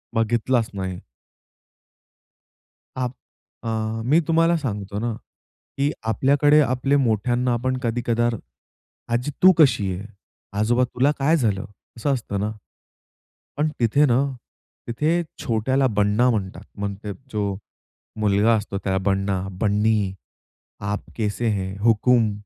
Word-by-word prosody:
बघितलाच 115 +1 +1
नाही. 95 -2 -4 2.0
आप 125 -1 -2 0.5
अ, 110 -1 -2
मी 150 +6 +4
तुम्हाला 165 +1 +3
सांगतो 105 -8 -4
ना, 120 +1 -1 0.7
की 140 +2 +1 0.2
आपल्याकडे 145 +5 +4
आपले 130 +1 +1
मोठ्यांना 120 0 +1
आपण 130 +2 -1
कधी 120 0 0
कधार 120 0 +1 0.8
आजी 125 +5 0
तू 185 - +10
कशी 130 - +4
आहे? 95 +3 -6 0.5
आजोबा 120 +4 +3
तुला 125 +3 +1
काय 150 +5 +3
झालं? 110 -6 0 0.3
असं 140 +5 0
असतं 110 -6 -3
ना. 105 +2 -1 1.1
पण 150 +1 +1
तिथे 125 +5 +4
ना, 125 -2 +3 0.7
तिथे 155 +9 +1 0.2
छोट्याला 130 +4 +1
बन्ना 105 +2 +2
म्हणतात. 100 -5 -2 0.2
म्हणजे 100 0 -4 0.2
जो 100 -2 -1 0.6
मुलगा 105 +2 +3
असतो 105 -2 -4
त्याला 95 -1 0
बन्ना, 95 -1 0 0.2
बन्नी, 105 -1 +2 0.7
आप 100 +1 -3
कैसे 110 +1 -1
हैं, 95 -2 -2
हुकूम, 115 0 +3
115 Hz, 120 wpm, -23 LUFS, 105-130 Hz, 2.0 s, तू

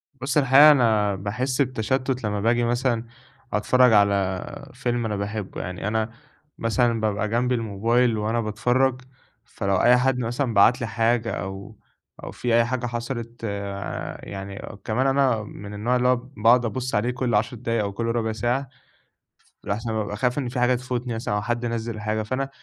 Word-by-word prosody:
بُص 135 +2 -2
الحقيقة 140 +2 +8
أنا 110 -7 +3
باحس 125 +8 -2
بتشتُت 130 +1 -1
لمّا 105 -1 -1
باجي 120 +2 +2
مثلًا 120 -1 0 0.5
أتفرج 125 +3 +4
على 100 -2 +1
فيلم 120 -1 -2
أنا 105 -2 -2
باحبه 100 0 -4
يعني، 90 +2 -5
أنا 110 +1 0 0.5
مثلًا 115 0 +1
بابقى 105 0 0
جنبي 125 +2 +1
الموبايل 115 +2 +1
وأنا 110 +2 0
باتفرج، 125 +4 +1 0.4
فلو 100 0 -2
أي 120 +6 +5
حد 125 0 +1
مثلًا 120 +1 -1
بعت 105 +5 +5
لي 115 - -1
حاجة 115 0 +1
أو 95 +4 -6 0.5
أو - - -6
في 120 -2 0
أي 115 0 +4
حاجة 125 0 -2
حصلت 120 0 -5
آآ، 100 -1 -4
يعني 100 0 -7 0.2
كمان 125 +5 +1
أنا 135 -5 +2
من 105 0 -9
النوع 115 +5 0
اللي 125 0 +2
هو 125 - +5
باقعد 120 -1 +2
أبُصّ 130 +1 -3
عليه 120 +4 +1
كل 125 -3 -1
10 115 +3 0
دقايق 115 -2 -1
أو 100 - -3
كل 115 +4 -4
ربع 115 -1 0
ساعة 120 +5 -1 0.9
لأحسن 110 +3 -3
بابقى 105 -1 -2
خايف 125 +2 0
إن 125 -4 -2
في 125 0 -3
حاجة 125 +1 +3
تفوتني 125 -1 -3
مثلًا 115 -2 -2
أو 105 - 0
حد 120 +2 -2
نزِّل 115 -1 -3
حاجة، 110 +1 -1
فأنا 135 +4 -2
115 Hz, 170 wpm, -24 LUFS, 105-125 Hz, 0.9 s, الحقيقة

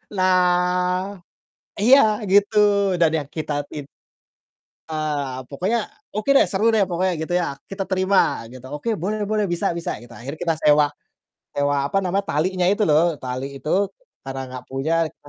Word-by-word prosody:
Nah 180 +1 +2 0.6
iya, 250 +6 +7 0.3
gitu, 205 +2 +4 0.4
dan 165 -2 +5
yang 145 -2 -5
kita 155 -1 -3 0.2
tid 145 -2 -7 1.0
eee, 150 -4 -2
pokoknya, 190 +11 0 0.3
"Oke 215 +5 -3
deh, - - +5
seru 210 +3 +1
deh 220 -3 +3
pokoknya," 185 +1 0
gitu 160 +3 -4
ya, 170 -6 0
"Kita 195 -1 -5
terima," 190 -8 +2
gitu, 130 0 -11
"Oke 150 +11 -2
boleh 210 +3 -2
boleh 210 0 0
bisa 175 +2 0
bisa," 170 0 -4
gitu. 120 0 -14
Akhirnya 135 +6 -8
kita 165 -1 0
sewa 150 0 +5 0.6
sewa, 145 -1 0
apa 195 - 0
namanya, 195 +1 0
talinya 180 +5 0
itu 205 +2 +2
loh, 160 +1 +3
tali 130 +2 -5
itu 190 +8 0 0.3
karena 135 0 -5
enggak 130 -1 -8
punya 135 +5 -1 0.2
rek - - -28
175 Hz, 155 wpm, -22 LUFS, 145-195 Hz, 1.0 s, iya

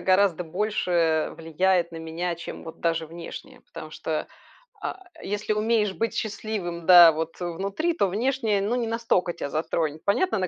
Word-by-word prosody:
гораздо 185 -2 +3
больше 175 -3 0
влияет 170 +2 +1
на - - -7
меня, 165 +2 -3
чем 170 0 -8
вот 160 - -10
даже 165 -1 0
внешнее. 165 +1 -9
Потому - - -10
что, - - -3 0.6
а, - - -4 0.2
если 205 +2 -2
умеешь 215 -1 +1
быть 230 +4 -2
счастливым, 200 -6 -4
да, 175 -2 +10
вот 160 +1 -4
внутри, 195 - -2
то 320 - +1
внешнее, 220 0 0
ну, 210 +5 0
не 240 -2 -1
настолько 225 -6 +1
тя 155 -4 -5
затронет. 155 0 -2
Понятно, 220 - +2
на 185 - 0
185 Hz, 160 wpm, -25 LUFS, 165-215 Hz, 0.6 s, да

